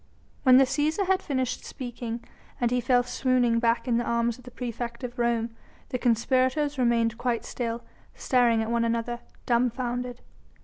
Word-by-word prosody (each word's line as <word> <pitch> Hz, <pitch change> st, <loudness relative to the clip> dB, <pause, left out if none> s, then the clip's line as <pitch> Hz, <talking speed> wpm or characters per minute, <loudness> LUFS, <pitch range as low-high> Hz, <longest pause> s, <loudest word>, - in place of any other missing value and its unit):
When 255 Hz, -1 st, +7 dB
the 270 Hz, -, +7 dB
Cæsar 295 Hz, +8 st, 0 dB
had 380 Hz, +1 st, +2 dB
finished 260 Hz, -6 st, -2 dB
speaking, 240 Hz, -2 st, -6 dB, 0.4 s
and 240 Hz, -1 st, +1 dB
he 250 Hz, 0 st, +2 dB
fell 245 Hz, 0 st, +3 dB
swooning 245 Hz, -2 st, +2 dB
back 230 Hz, +2 st, +1 dB
in 235 Hz, -2 st, +2 dB
the 240 Hz, -, +1 dB
arms 235 Hz, 0 st, 0 dB
of 250 Hz, -, -16 dB
the -, -, -8 dB
praefect 235 Hz, 0 st, -5 dB
of 245 Hz, 0 st, -6 dB
Rome, 235 Hz, -1 st, 0 dB, 0.3 s
the 250 Hz, -, -2 dB
conspirators 260 Hz, +4 st, +1 dB
remained 230 Hz, -2 st, +2 dB
quite 240 Hz, -2 st, -1 dB
still, 235 Hz, -1 st, -3 dB, 0.3 s
staring 240 Hz, -3 st, +3 dB
at 220 Hz, -, -3 dB
one 235 Hz, 0 st, +2 dB
another, 230 Hz, +1 st, -1 dB, 0.3 s
dumbfounded. 245 Hz, 0 st, 0 dB
240 Hz, 165 wpm, -27 LUFS, 235-255 Hz, 0.4 s, When